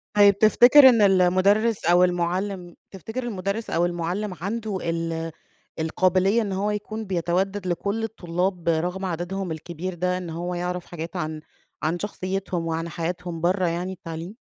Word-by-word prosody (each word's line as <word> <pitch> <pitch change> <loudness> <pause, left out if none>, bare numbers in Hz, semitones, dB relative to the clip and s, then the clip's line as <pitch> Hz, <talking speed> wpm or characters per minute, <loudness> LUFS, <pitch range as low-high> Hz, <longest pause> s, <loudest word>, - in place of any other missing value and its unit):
طيب 200 -1 +6
تفتكر 245 +6 +8
إن 230 -3 +4
المُدرِّس 195 +3 +3
أو 175 +1 +5
المُعلِّم، 180 +1 -1 0.2
تفتكر 220 +7 -6
المُدرِّس 200 -1 -3
أو 170 +1 +2
المُعلِّم 175 +4 -2
عَنده 210 +1 -3
ال 165 -1 -2 0.5
القابلية 185 +6 +2
إن 205 -3 -3
هو 200 +2 0
يكون 215 +1 -4
بيتودَّد 185 +2 -1
لكلّ 200 +5 -1
الطلاب 180 -4 -2
رغم 175 +4 -1
عددهم 180 +1 -3
الكبير 170 +3 -5
ده، 180 +1 -1
إن 180 -2 -6
هو 175 +2 -4
يعرَف 180 0 -3
حاجات 165 -1 -7
عن 155 0 -3 0.4
عن 165 +3 0
شخصيّتهم 190 -3 -3
وعن 165 +1 -2
حياتهم 170 0 -4
برّه 180 +1 +2
يعني 175 +3 -2
التعليم؟ 165 +3 -8
180 Hz, 145 wpm, -24 LUFS, 170-200 Hz, 0.5 s, تفتكر